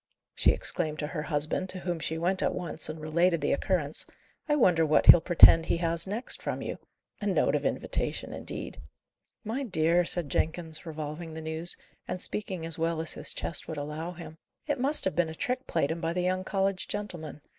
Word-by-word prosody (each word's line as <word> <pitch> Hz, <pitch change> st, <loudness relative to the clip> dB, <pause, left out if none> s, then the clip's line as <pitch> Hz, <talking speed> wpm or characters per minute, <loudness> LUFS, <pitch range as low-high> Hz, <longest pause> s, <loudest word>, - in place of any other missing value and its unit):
she -, -, +3 dB
exclaimed 155 Hz, -4 st, -1 dB
to 150 Hz, -, -2 dB
her 150 Hz, +1 st, -4 dB
husband, 155 Hz, +4 st, -1 dB
to 185 Hz, -1 st, +2 dB
whom 175 Hz, -2 st, -3 dB
she 160 Hz, +2 st, -3 dB
went 185 Hz, +3 st, 0 dB
at -, -, 0 dB
once 165 Hz, -3 st, -1 dB
and 155 Hz, +1 st, -6 dB
related 170 Hz, +3 st, +1 dB
the 145 Hz, -, 0 dB
occurrence. 155 Hz, -2 st, 0 dB, 0.4 s
"I 295 Hz, -, +4 dB
wonder 180 Hz, -, +4 dB
what 155 Hz, -1 st, +3 dB
he'll 170 Hz, -, +10 dB
pretend 165 Hz, -1 st, +7 dB
he -, -, +1 dB
has 170 Hz, +1 st, +1 dB
next 220 Hz, +6 st, -1 dB
from -, -, -4 dB
you? -, -, -5 dB, 0.4 s
A -, -, -2 dB
note -, -, +2 dB
of -, -, -1 dB
invitation, -, -, -2 dB
indeed!" -, -, -7 dB, 0.6 s
"My 230 Hz, +5 st, -3 dB
dear," 175 Hz, -, +2 dB
said 170 Hz, -3 st, +1 dB
Jenkins, 160 Hz, +1 st, -2 dB
revolving 155 Hz, +1 st, -6 dB
the -, -, -5 dB
news, 160 Hz, +2 st, -1 dB, 0.3 s
and 185 Hz, -, -4 dB
speaking 185 Hz, -4 st, -1 dB
as 165 Hz, -1 st, 0 dB
well 165 Hz, 0 st, 0 dB
as 160 Hz, 0 st, -1 dB
his -, -, -5 dB
chest 165 Hz, -, -2 dB
would 160 Hz, -, -5 dB
allow 150 Hz, +4 st, -5 dB
him, 160 Hz, -2 st, -11 dB, 0.3 s
"it 290 Hz, -3 st, -2 dB
must 280 Hz, +4 st, +3 dB
have 190 Hz, -, -1 dB
been 175 Hz, -2 st, +1 dB
a 160 Hz, -, -7 dB
trick 255 Hz, +8 st, -3 dB
played 160 Hz, -3 st, 0 dB
him 165 Hz, +1 st, -4 dB
by 165 Hz, 0 st, -1 dB
the 180 Hz, -, -1 dB
young 185 Hz, +1 st, 0 dB
college 195 Hz, 0 st, -1 dB
gentlemen. 175 Hz, -8 st, -6 dB
170 Hz, 205 wpm, -28 LUFS, 160-185 Hz, 0.6 s, he'll